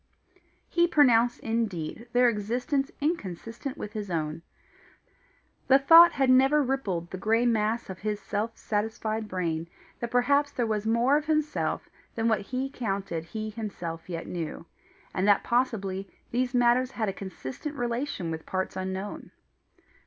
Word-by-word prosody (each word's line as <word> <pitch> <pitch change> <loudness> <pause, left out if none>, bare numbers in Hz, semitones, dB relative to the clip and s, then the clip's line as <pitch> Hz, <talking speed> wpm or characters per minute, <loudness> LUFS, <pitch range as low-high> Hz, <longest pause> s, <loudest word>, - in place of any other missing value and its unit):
He 345 0 +3
pronounced 245 -7 +4
indeed 225 -2 -2
their 245 +1 +5
existence 245 +6 0
inconsistent 255 - -3
with 210 - -6
his 210 -2 -5
own. 160 -1 -2 1.3
The 270 - +7
thought 330 +5 +8
had 270 -1 +2
never 270 +3 +5
rippled 200 -11 -2
the 185 - -5
grey 225 +4 +2
mass 225 0 +1
of 190 -1 -7
his 210 0 -2
self 210 +3 -3
satisfied 220 +1 -2
brain 170 -4 -2 0.3
that 235 - -3
perhaps 280 +4 +3
there 245 -4 -1
was 215 -1 -1
more 240 +5 +4
of 300 - -3
himself 305 -1 0 0.3
than 225 0 0
what 220 -3 +2
he 255 +6 -3
counted 195 - -3
he 215 +4 -5
himself 180 -7 -6
yet 165 -2 -4
knew, 165 -2 -5 0.5
and 185 +2 0
that 205 -1 +5
possibly 200 -6 -1 0.2
these 250 +1 0
matters 245 +1 +4
had 220 -4 -2
a 195 - -1
consistent 190 - -7
relation 240 - -2
with 160 0 -6
parts 185 0 -2
unknown. 190 +2 -4
225 Hz, 145 wpm, -28 LUFS, 190-255 Hz, 1.3 s, thought